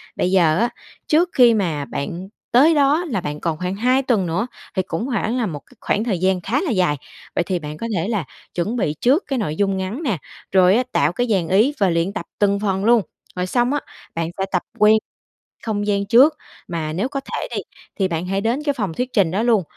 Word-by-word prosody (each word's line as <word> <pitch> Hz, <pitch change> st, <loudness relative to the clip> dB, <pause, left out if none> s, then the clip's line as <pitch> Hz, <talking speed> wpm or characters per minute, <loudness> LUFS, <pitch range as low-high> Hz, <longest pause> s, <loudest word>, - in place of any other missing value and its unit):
Bây 180 Hz, -, 0 dB
giờ 170 Hz, -4 st, +4 dB
á, 235 Hz, +2 st, +2 dB, 0.4 s
trước 335 Hz, +3 st, +3 dB
khi 245 Hz, -2 st, +6 dB
mà 165 Hz, -9 st, -1 dB
bạn 170 Hz, +7 st, -5 dB, 0.3 s
tới 300 Hz, +7 st, +6 dB
đó 295 Hz, +4 st, +3 dB
là 225 Hz, -, -2 dB
bạn 150 Hz, -2 st, -4 dB
còn 165 Hz, -2 st, -2 dB
khoảng 180 Hz, +3 st, -3 dB
2 255 Hz, +5 st, +2 dB
tuần 230 Hz, -8 st, +1 dB
nữa, 185 Hz, +9 st, -1 dB, 0.3 s
thì 190 Hz, -, +2 dB
cũng 165 Hz, +8 st, -2 dB
hoảng 235 Hz, -1 st, -1 dB
là 240 Hz, -, +1 dB
một 155 Hz, -7 st, -4 dB
cái -, -, -22 dB
khoảng 210 Hz, -, 0 dB
thời 210 Hz, -7 st, -1 dB
gian 185 Hz, 0 st, +1 dB
khá 235 Hz, +11 st, 0 dB
là 345 Hz, -, -1 dB
dài, 180 Hz, -8 st, +2 dB, 0.4 s
vậy -, -, +2 dB
thì 180 Hz, 0 st, -2 dB
bạn 150 Hz, -1 st, -7 dB
có 230 Hz, -, -4 dB
thể 170 Hz, +1 st, -1 dB
là 210 Hz, -8 st, -1 dB, 0.3 s
chuẩn 190 Hz, +7 st, -1 dB
bị 180 Hz, -11 st, 0 dB
trước 275 Hz, +9 st, +3 dB
cái 270 Hz, -3 st, -1 dB
nội 155 Hz, -8 st, -2 dB
dung 195 Hz, +1 st, +1 dB
ngắn 190 Hz, -, -4 dB
nè, 230 Hz, -, 0 dB, 0.3 s
rồi 185 Hz, 0 st, +5 dB
á, 250 Hz, -, +3 dB
tạo -, -, +2 dB
cái 245 Hz, -1 st, 0 dB
dàn 190 Hz, -6 st, +1 dB
ý 215 Hz, -, +3 dB
và 195 Hz, -2 st, +3 dB
luyện 170 Hz, +3 st, 0 dB
tập -, -, -5 dB
từng 200 Hz, -1 st, +2 dB
phần 195 Hz, -1 st, -1 dB
luôn. 235 Hz, 0 st, +5 dB, 0.3 s
Rồi 180 Hz, 0 st, -1 dB
xong 245 Hz, +6 st, +1 dB
á, 290 Hz, -, +1 dB, 0.4 s
bạn 165 Hz, 0 st, -1 dB
sẽ 190 Hz, -, 0 dB
tập 180 Hz, -, +1 dB, 0.2 s
quen 215 Hz, +1 st, +6 dB, 0.7 s
không 205 Hz, -2 st, -2 dB
gian 200 Hz, -1 st, +1 dB
trước, 260 Hz, +9 st, +6 dB, 0.3 s
mà 160 Hz, -3 st, -3 dB
nếu 195 Hz, +10 st, -1 dB
có 275 Hz, -, -3 dB
thể -, -, -4 dB
đi, -, -, -1 dB, 0.4 s
thì 190 Hz, -, +3 dB
bạn 170 Hz, -1 st, -3 dB
hãy 195 Hz, +1 st, -1 dB
đến 235 Hz, +7 st, 0 dB
cái 290 Hz, -1 st, +1 dB
phòng 200 Hz, -10 st, -3 dB
thuyết 250 Hz, +7 st, -3 dB
trình 190 Hz, -7 st, +3 dB
đó 200 Hz, +5 st, 0 dB
luôn, 225 Hz, -5 st, +3 dB
200 Hz, 240 wpm, -21 LUFS, 180-240 Hz, 0.7 s, khi